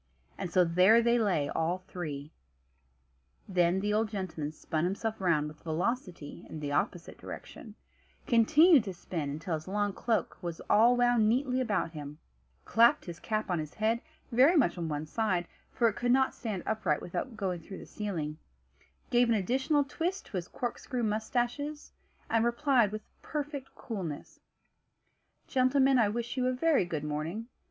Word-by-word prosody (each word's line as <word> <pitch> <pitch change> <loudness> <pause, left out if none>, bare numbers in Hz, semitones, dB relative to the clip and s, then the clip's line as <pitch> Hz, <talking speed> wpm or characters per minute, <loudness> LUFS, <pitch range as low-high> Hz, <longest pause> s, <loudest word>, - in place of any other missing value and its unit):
And 175 - -5
so 185 - +5
there 185 +7 +5
they 235 +1 +3
lay, 180 -10 +1
all 165 +3 0
three. 150 -4 -6 1.2
Then 180 0 +2
the 210 +1 0
old 215 +1 +1
gentleman 180 -7 -4
spun 155 0 -3
himself 200 +4 -2
round 160 -5 +2
with 150 0 -11
velocity 175 - -3
in 155 - -6
the 145 -1 -4
opposite 170 +4 -2
direction; 215 -3 -9 0.5
continued 295 - +6
to 190 -3 -5
spin 160 -4 -4
until 155 +5 -4
his 155 +1 -4
long 205 +1 0
cloak 225 +2 -1
was 170 -2 -5
all 235 +3 +6
wound 240 -3 +4
neatly 255 +2 +1
about 205 -8 0
him; 150 -2 -8 0.5
clapped 230 +2 +4
his 170 -1 -7
cap 215 -3 -2
on 175 - +1
his 155 -1 -6
head, 225 +2 +1 0.3
very 265 +9 +5
much 240 - +3
on 170 -2 -3
one 150 0 -3
side 185 -1 -1 0.2
(for 235 - +2
it 220 - 0
could 245 0 0
not 265 +1 +3
stand 210 -7 -4
upright 205 -9 0
without 225 +6 -4
going 185 -4 -2
through 190 +4 -9
the - - -10
ceiling), 165 -8 -4 0.7
gave 245 -1 +4
an 230 - +4
additional 265 - +1
twist 345 +7 -3
to 195 - -5
his 175 0 -4
corkscrew 245 0 -4
moustaches, 240 +7 -2 0.4
and 225 0 +2
replied 235 -2 +3
with 215 0 -5 0.2
perfect 290 -3 -5
coolness: 185 - -6 1.1
"Gentlemen, 265 0 +3
I 215 -3 +4
wish 235 +4 -4
you 255 0 +1
a 255 - +1
very 285 - +2
good 160 -4 -4
morning. 160 +10 -4
210 Hz, 165 wpm, -30 LUFS, 170-245 Hz, 1.2 s, continued